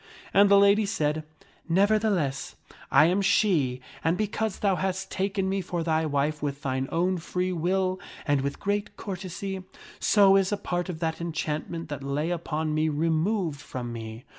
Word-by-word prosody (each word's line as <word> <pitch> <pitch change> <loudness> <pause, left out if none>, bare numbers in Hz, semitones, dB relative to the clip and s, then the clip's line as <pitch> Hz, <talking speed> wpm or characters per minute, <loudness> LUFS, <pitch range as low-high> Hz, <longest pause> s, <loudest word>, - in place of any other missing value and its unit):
And 200 0 +6
the 200 - +7
lady 200 +1 +5
said, 155 -5 -1 0.2
" - - -31
Nevertheless, 200 -9 +1 0.3
I 140 +3 +6
am 180 +4 +2
she 170 - +2 0.2
and 165 +2 +2
because 215 -1 -1
thou 195 -2 +2
hast 190 +1 -2
taken 195 0 -1
me 195 0 0
for 175 -1 -3
thy 160 -1 +1
wife 145 +1 0
with 145 0 -3
thine 130 -1 -1
own 180 +2 +1
free 180 +2 -2
will 185 +2 0 0.3
and 145 -3 +2
with 140 +1 -3
great 205 0 -2
courtesy, 190 -1 -5 0.4
so 195 -2 +5
is 195 0 +1
a 205 - +1
part 180 -2 -3
of 165 -2 -5
that 160 0 -2
enchantment 165 0 -3
that 145 -1 -5
lay 145 +5 -1
upon 160 -2 -2
me 155 +1 +1
removed 160 +1 0
from 120 -2 -6
me. 110 0 -7
175 Hz, 170 wpm, -27 LUFS, 150-195 Hz, 0.4 s, the